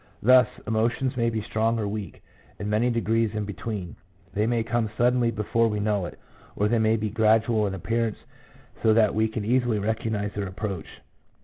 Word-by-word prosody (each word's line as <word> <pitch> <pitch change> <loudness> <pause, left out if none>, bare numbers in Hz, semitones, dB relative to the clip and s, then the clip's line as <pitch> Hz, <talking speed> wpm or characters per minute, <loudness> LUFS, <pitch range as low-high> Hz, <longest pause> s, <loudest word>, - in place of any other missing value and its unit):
Thus, 130 +2 +7 0.2
emotions 115 +4 0
may 115 -1 +1
be 110 -2 -3
strong 110 +2 0
or 105 -2 -1
weak, 105 -1 -6 0.3
and 100 - -5
many 110 +4 +2
degrees 115 -2 0
in 105 -1 -2
between; 100 -2 -5 0.4
they 105 +2 +1
may 120 -1 +1
come 115 -1 -1
suddenly 120 0 +3
before 115 +1 +1
we 105 -2 -1
know 105 -3 0
it, - - -11 0.4
or 105 - +1
they 115 +1 +2
may 110 0 +3
be 110 -1 -2
gradual 110 0 +3
in 95 - -3
appearance 115 +3 -1 0.6
so 110 -1 +4
that 110 -2 +4
we 110 +1 +2
can 110 -1 -4
easily 120 -1 +2
recognize 105 -1 -2
their 100 -1 -3
approach. 95 -3 -5
110 Hz, 185 wpm, -25 LUFS, 105-115 Hz, 0.6 s, Thus